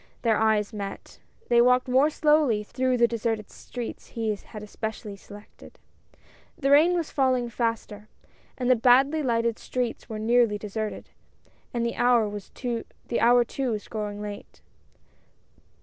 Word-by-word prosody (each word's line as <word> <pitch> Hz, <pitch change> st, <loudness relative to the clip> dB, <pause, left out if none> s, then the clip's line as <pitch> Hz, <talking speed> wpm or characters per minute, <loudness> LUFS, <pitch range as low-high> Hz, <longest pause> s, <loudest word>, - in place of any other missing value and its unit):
Their 225 Hz, -3 st, +3 dB
eyes 220 Hz, -1 st, +1 dB
met. 200 Hz, -2 st, -7 dB, 0.3 s
They 235 Hz, 0 st, +5 dB
walked 250 Hz, +1 st, +4 dB
more 260 Hz, +4 st, +4 dB
slowly 300 Hz, -8 st, +2 dB
through 255 Hz, +3 st, -1 dB
the 235 Hz, 0 st, +5 dB
deserted 225 Hz, -2 st, -3 dB
streets 245 Hz, -2 st, -8 dB
he 225 Hz, -2 st, -2 dB
had 210 Hz, +1 st, -11 dB
especially 210 Hz, 0 st, -6 dB
selected. 205 Hz, +1 st, -14 dB, 0.8 s
The 275 Hz, -1 st, 0 dB
rain 320 Hz, +5 st, +6 dB
was 335 Hz, -3 st, -2 dB
falling 255 Hz, -3 st, +1 dB
faster, 225 Hz, -2 st, -3 dB, 0.5 s
and 250 Hz, -, -2 dB
the 255 Hz, -, +6 dB
badly 265 Hz, +6 st, +4 dB
lighted 235 Hz, -3 st, 0 dB
streets 250 Hz, -2 st, -4 dB
were 220 Hz, -, -4 dB
nearly 225 Hz, -1 st, +2 dB
deserted, 215 Hz, +1 st, -5 dB, 0.6 s
and 235 Hz, -1 st, -1 dB
the 235 Hz, -, -3 dB
hour 235 Hz, -4 st, +3 dB
too 240 Hz, +3 st, 0 dB
was 210 Hz, -2 st, -4 dB
growing 210 Hz, -1 st, -5 dB
late. 205 Hz, -1 st, -9 dB
235 Hz, 135 wpm, -26 LUFS, 215-250 Hz, 0.8 s, rain